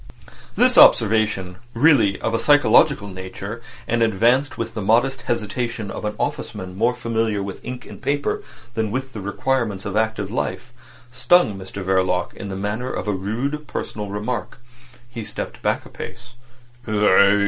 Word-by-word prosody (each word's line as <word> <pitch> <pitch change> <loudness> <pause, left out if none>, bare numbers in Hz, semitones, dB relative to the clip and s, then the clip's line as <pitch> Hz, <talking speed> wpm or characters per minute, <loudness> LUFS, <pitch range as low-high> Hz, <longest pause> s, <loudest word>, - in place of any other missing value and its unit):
This - - +5
observation, 105 -4 +4 0.2
really 115 -7 +4
of 115 - -1
a 115 - +1
psychological 145 -3 +4
nature, 95 +4 -7 0.3
and 120 0 0
advanced 115 +6 +2
with 115 -1 -4
the 110 - -4
modest 120 +6 +2
hesitation 115 -1 -3
of - - -6
an 105 - -1
officeman 105 -8 -4
more 120 +5 +1
familiar 115 -4 -1
with 100 -1 -7
ink 125 0 -7
and - - -11
paper 140 +1 -1 0.3
than 110 -2 -1
with 130 +3 -4
the 105 - -6
requirements 105 -1 -1
of 100 0 -4
active 110 -2 0
life, 120 0 -3 0.4
stung 130 - +3
Mr 95 0 -7
Verloc 95 -1 +1
in 100 - -7
the 95 - -4
manner 105 +6 -3
of - - -4
a - - +2
rude 125 +11 -3
personal 105 -4 -5
remark. 105 +3 -4 0.5
He 120 -2 -7
stepped - - -6
back - - 0
a - - -12
pace. 115 0 -9
110 Hz, 155 wpm, -22 LUFS, 100-125 Hz, 0.5 s, This